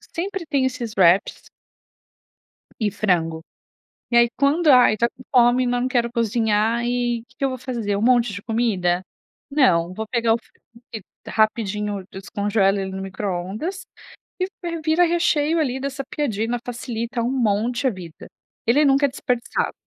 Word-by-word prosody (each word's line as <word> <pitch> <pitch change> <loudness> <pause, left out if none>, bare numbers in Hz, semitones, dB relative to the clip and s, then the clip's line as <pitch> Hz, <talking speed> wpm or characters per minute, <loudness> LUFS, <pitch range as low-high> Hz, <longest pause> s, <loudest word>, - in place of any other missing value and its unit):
Sempre 385 +1 -5
tenho 275 -3 +1
esses 240 -4 -4
wraps 185 +1 +3 1.3
e 210 -2 0
frango. 165 -6 0 0.7
E 235 - +2
aí, 235 0 +6
quando 290 +5 +2
"ai, 250 -5 +6
tá 235 +2 +2
com 255 - -16
fome, 245 +1 +5
mas 245 0 0
não 255 - 0
quero 240 -3 0
cozinhar" 225 0 +1
e 240 -1 -1
"Que - - -26
que 275 - -1
eu - - +3
vou 255 - -5
fazer? 230 -5 -3
Um 205 - -2
monte 240 -2 +3
de 200 +1 -7
comida? 195 -6 0 0.5
Não. 185 - +3
Vou 220 +1 -4
pegar 230 -2 +2
o - - -1
frango, 235 0 -25
que 220 - -6 0.3
rapidinho 210 -2 0
eu 185 - -12
descongelo 200 0 0
ele 190 0 -4
no 190 0 -5
microondas 195 - -4 0.6
e 370 - +1 0.2
vi 335 -2 -4
vira 320 +3 +3
recheio 330 -2 +1
ali 265 -3 -1
dessa 275 0 -4
piadina. 235 -5 -2
Facilita 235 -1 -4
um 245 - 0
monte 240 +1 0
a - - +4
vida. 180 -7 -9 0.4
Ele 290 +6 +4
nunca 275 +1 +4
é - - -5
desperdiçado. 250 -3 -2
235 Hz, 165 wpm, -22 LUFS, 205-260 Hz, 1.3 s, aí